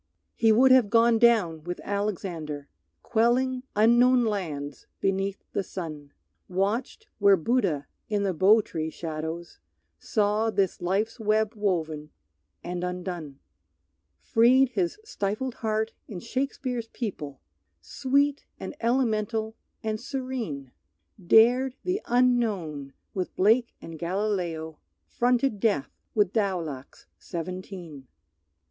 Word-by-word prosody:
He 225 Hz, -1 st, +3 dB
would 255 Hz, +4 st, +6 dB
have 255 Hz, -5 st, +6 dB
gone 230 Hz, +1 st, +4 dB
down 205 Hz, -10 st, +3 dB
with 175 Hz, +1 st, -5 dB
Alexander, 175 Hz, -8 st, -3 dB, 0.4 s
Quelling 250 Hz, +3 st, +2 dB
unknown 240 Hz, +3 st, +5 dB
lands 155 Hz, -9 st, -4 dB
beneath 195 Hz, 0 st, -1 dB
the -, -, +1 dB
sun; 155 Hz, -7 st, -7 dB, 0.4 s
Watched 205 Hz, -, -1 dB
where 200 Hz, -2 st, +6 dB
Buddha 175 Hz, -, 0 dB, 0.2 s
in 205 Hz, -1 st, 0 dB
the 195 Hz, -2 st, 0 dB
Bo 200 Hz, +6 st, +5 dB
tree 160 Hz, -5 st, -4 dB
shadows 160 Hz, +1 st, -6 dB, 0.4 s
Saw 210 Hz, +1 st, +1 dB
this 195 Hz, -3 st, 0 dB
life's 205 Hz, +7 st, -1 dB
web 215 Hz, 0 st, +1 dB
woven 160 Hz, -8 st, -2 dB, 0.5 s
and 175 Hz, 0 st, -4 dB
undone; 180 Hz, -5 st, -5 dB, 0.8 s
Freed 250 Hz, +3 st, +4 dB
his 350 Hz, +9 st, -1 dB
stifled 250 Hz, -, -3 dB
heart 220 Hz, 0 st, -1 dB
in 195 Hz, -5 st, -6 dB
Shakespeare's 250 Hz, 0 st, -3 dB
people, 155 Hz, -, -5 dB, 0.4 s
Sweet 275 Hz, -, 0 dB, 0.2 s
and -, -, -6 dB
elemental 225 Hz, -2 st, 0 dB, 0.3 s
and 215 Hz, 0 st, -2 dB
serene; 245 Hz, -, -4 dB, 0.5 s
Dared 245 Hz, +7 st, +5 dB
the 370 Hz, +3 st, -1 dB
unknown 215 Hz, -, +1 dB, 0.2 s
with 185 Hz, -2 st, -3 dB
Blake 225 Hz, +5 st, +3 dB
and 165 Hz, -1 st, -9 dB
Galileo; 175 Hz, -4 st, -2 dB, 0.3 s
Fronted 245 Hz, -2 st, +1 dB
death 200 Hz, -10 st, +1 dB, 0.2 s
with 205 Hz, -3 st, +2 dB
Daulac's 175 Hz, -, -3 dB
seventeen. 175 Hz, -4 st, -7 dB
205 Hz, 110 wpm, -27 LUFS, 170-235 Hz, 0.8 s, would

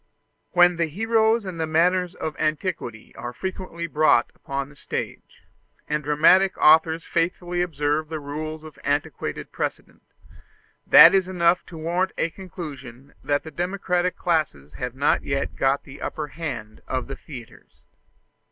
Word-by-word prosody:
When 175 Hz, -1 st, +5 dB
the 170 Hz, -1 st, +1 dB
heroes 220 Hz, +5 st, +2 dB
and 180 Hz, -3 st, -6 dB
the 160 Hz, -, -1 dB
manners 180 Hz, +3 st, +2 dB
of 155 Hz, -, -4 dB
antiquity 155 Hz, -, -3 dB
are 120 Hz, 0 st, -6 dB
frequently 185 Hz, 0 st, -5 dB
brought 155 Hz, -6 st, +3 dB
upon 140 Hz, 0 st, -4 dB
the 150 Hz, -, -17 dB
stage, -, -, -6 dB, 0.4 s
and 150 Hz, 0 st, -1 dB
dramatic 165 Hz, +7 st, +4 dB
authors 160 Hz, +1 st, +5 dB
faithfully 175 Hz, +1 st, -1 dB
observe 150 Hz, -2 st, -1 dB
the 160 Hz, -1 st, -4 dB
rules 155 Hz, +2 st, -6 dB
of 155 Hz, -2 st, -12 dB
antiquated 145 Hz, +1 st, -2 dB
precedent, -, -, -5 dB, 0.9 s
that -, -, +10 dB
is 190 Hz, -2 st, +3 dB
enough 175 Hz, -1 st, +2 dB
to 165 Hz, -, -10 dB
warrant 175 Hz, +4 st, -1 dB
a 165 Hz, -, 0 dB
conclusion 145 Hz, -9 st, -9 dB
that 145 Hz, 0 st, 0 dB
the 160 Hz, -, -9 dB
democratic 180 Hz, 0 st, -1 dB
classes 145 Hz, -, -1 dB
have 125 Hz, +8 st, -5 dB
not 140 Hz, +2 st, +2 dB
yet 140 Hz, 0 st, -2 dB
got 135 Hz, +1 st, +1 dB
the 140 Hz, 0 st, -12 dB
upper 150 Hz, -1 st, -4 dB
hand 135 Hz, -9 st, -6 dB
of 130 Hz, -2 st, -2 dB
the 135 Hz, -, -6 dB
theatres. 125 Hz, -6 st, -13 dB
160 Hz, 145 wpm, -24 LUFS, 145-180 Hz, 0.9 s, that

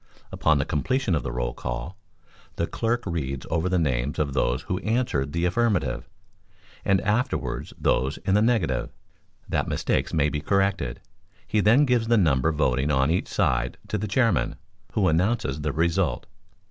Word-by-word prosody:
Upon 80 Hz, -2 st, +2 dB
the 70 Hz, -, 0 dB
completion 130 Hz, -, 0 dB
of 80 Hz, -, +1 dB
the -, -, -4 dB
roll -, -, -2 dB
call -, -, -5 dB, 0.6 s
the 85 Hz, -, 0 dB
clerk 120 Hz, +6 st, -1 dB
reads 70 Hz, -7 st, -3 dB
over 80 Hz, +3 st, +1 dB
the 90 Hz, -, +2 dB
names 70 Hz, -3 st, 0 dB
of 70 Hz, -3 st, -1 dB
those 65 Hz, 0 st, 0 dB
who 90 Hz, +3 st, -2 dB
answered 105 Hz, -, 0 dB
the 85 Hz, +2 st, 0 dB
affirmative, 100 Hz, 0 st, 0 dB, 0.7 s
and 95 Hz, -1 st, +3 dB
afterwards 110 Hz, +5 st, -1 dB
those 65 Hz, +4 st, +1 dB
in 95 Hz, -, +2 dB
the 105 Hz, -, +4 dB
negative, 110 Hz, -6 st, +1 dB, 0.6 s
that -, -, -1 dB
mistakes -, -, 0 dB
may 75 Hz, -3 st, +2 dB
be 75 Hz, 0 st, -3 dB
corrected; 95 Hz, -7 st, 0 dB, 0.4 s
he 110 Hz, -, 0 dB
then 115 Hz, +8 st, +5 dB
gives 120 Hz, -4 st, +1 dB
the 120 Hz, 0 st, +4 dB
number 80 Hz, -5 st, +3 dB
voting 70 Hz, -2 st, +1 dB
on 65 Hz, +1 st, +2 dB
each 90 Hz, -, 0 dB
side 60 Hz, 0 st, 0 dB
to 105 Hz, -, -1 dB
the 105 Hz, -, -3 dB
Chairman, 115 Hz, -, +1 dB, 0.4 s
who 100 Hz, -4 st, +2 dB
announces 80 Hz, -, +1 dB
the 75 Hz, 0 st, -1 dB
result. 85 Hz, +2 st, 0 dB
85 Hz, 165 wpm, -25 LUFS, 70-105 Hz, 0.7 s, then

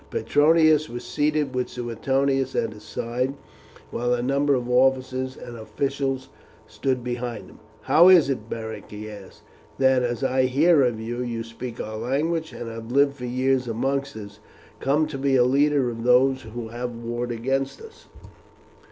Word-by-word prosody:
Petronius 155 Hz, 0 st, +3 dB
was 120 Hz, +1 st, -6 dB
seated 150 Hz, -2 st, 0 dB
with 125 Hz, 0 st, -1 dB
Suetonius 135 Hz, +3 st, -1 dB
at 110 Hz, -1 st, 0 dB
his 105 Hz, -, -13 dB
side, 125 Hz, +4 st, -3 dB, 0.6 s
while 120 Hz, +1 st, 0 dB
a 120 Hz, -, -3 dB
number 140 Hz, +2 st, +2 dB
of 125 Hz, -1 st, -2 dB
officers 130 Hz, +1 st, +1 dB
and 120 Hz, -, -9 dB
officials 135 Hz, +3 st, -3 dB, 0.4 s
stood 130 Hz, -2 st, -2 dB
behind 120 Hz, -5 st, -4 dB
him. -, -, -17 dB, 0.2 s
"How 175 Hz, +3 st, +6 dB
is 175 Hz, -7 st, +7 dB
it, 120 Hz, -5 st, -3 dB
Beric," 110 Hz, -1 st, -6 dB
he 105 Hz, +1 st, -8 dB
asked, 100 Hz, -2 st, -12 dB, 0.3 s
"that, 130 Hz, -1 st, +4 dB
as 120 Hz, +1 st, -2 dB
I 130 Hz, 0 st, +2 dB
hear, 145 Hz, +1 st, +4 dB
you, 115 Hz, +1 st, -5 dB
who 120 Hz, -2 st, -3 dB
speak 115 Hz, +1 st, -8 dB
our 110 Hz, 0 st, -5 dB
language 155 Hz, +8 st, -1 dB
and 120 Hz, -, -7 dB
have 115 Hz, 0 st, -7 dB
lived 140 Hz, +1 st, +3 dB
for 125 Hz, -, -6 dB
years 130 Hz, +1 st, 0 dB
amongst 135 Hz, +4 st, -2 dB
us, 105 Hz, 0 st, -10 dB, 0.4 s
come 145 Hz, +3 st, +2 dB
to 150 Hz, -3 st, -6 dB
be 135 Hz, 0 st, +2 dB
a 125 Hz, -, +5 dB
leader 140 Hz, 0 st, +2 dB
of 115 Hz, 0 st, -7 dB
those 130 Hz, +2 st, +4 dB
who 115 Hz, 0 st, -7 dB
have 120 Hz, +1 st, -5 dB
warred 120 Hz, +1 st, -4 dB
against 135 Hz, +4 st, -2 dB
us?" 450 Hz, 0 st, -14 dB
130 Hz, 165 wpm, -24 LUFS, 120-140 Hz, 0.6 s, is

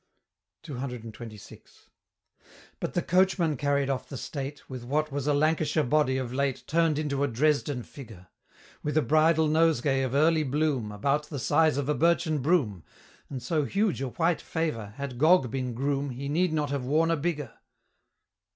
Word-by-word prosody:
CCXXVI. 120 Hz, -6 st, -8 dB, 1.1 s
But -, -, -4 dB
the -, -, +1 dB
Coachman 180 Hz, -3 st, +2 dB
carried 140 Hz, 0 st, 0 dB
off 135 Hz, -2 st, -3 dB
the 135 Hz, -, -6 dB
state, 140 Hz, +2 st, -6 dB
With 130 Hz, -2 st, -7 dB
what 150 Hz, +4 st, -1 dB
was 140 Hz, 0 st, -3 dB
a 145 Hz, -, +3 dB
Lancashire 155 Hz, +1 st, +2 dB
body 140 Hz, -1 st, +2 dB
of 125 Hz, -2 st, -4 dB
late 140 Hz, -1 st, -1 dB
Turn'd 165 Hz, -1 st, +2 dB
into 140 Hz, -2 st, -1 dB
a -, -, +2 dB
Dresden 140 Hz, 0 st, 0 dB
Figure; 110 Hz, -11 st, -12 dB, 0.6 s
With 150 Hz, +1 st, -2 dB
a 155 Hz, -, +4 dB
bridal 160 Hz, +1 st, +3 dB
Nosegay 150 Hz, -4 st, +2 dB
of 130 Hz, 0 st, -2 dB
early 160 Hz, +2 st, +4 dB
bloom, 140 Hz, -5 st, 0 dB
About 140 Hz, +8 st, 0 dB
the 145 Hz, -, -5 dB
size 155 Hz, +3 st, +2 dB
of 140 Hz, -2 st, -1 dB
a 150 Hz, -, +2 dB
birchen 165 Hz, -1 st, +2 dB
broom, 130 Hz, -, +1 dB, 0.5 s
And 130 Hz, -3 st, -6 dB
so 155 Hz, +3 st, 0 dB
huge 200 Hz, -3 st, 0 dB
a 135 Hz, -, -1 dB
White 165 Hz, +5 st, 0 dB
Favor, 115 Hz, -11 st, -3 dB
had 140 Hz, -3 st, -5 dB
Gog 155 Hz, -5 st, +4 dB
been 125 Hz, -2 st, -3 dB
Groom 140 Hz, +2 st, -1 dB
He 135 Hz, +2 st, -5 dB
need 175 Hz, +4 st, +1 dB
not 150 Hz, -2 st, -1 dB
have 140 Hz, -2 st, -2 dB
worn 160 Hz, +5 st, +2 dB
a -, -, +3 dB
bigger. 150 Hz, -5 st, -3 dB
145 Hz, 170 wpm, -27 LUFS, 130-155 Hz, 1.1 s, a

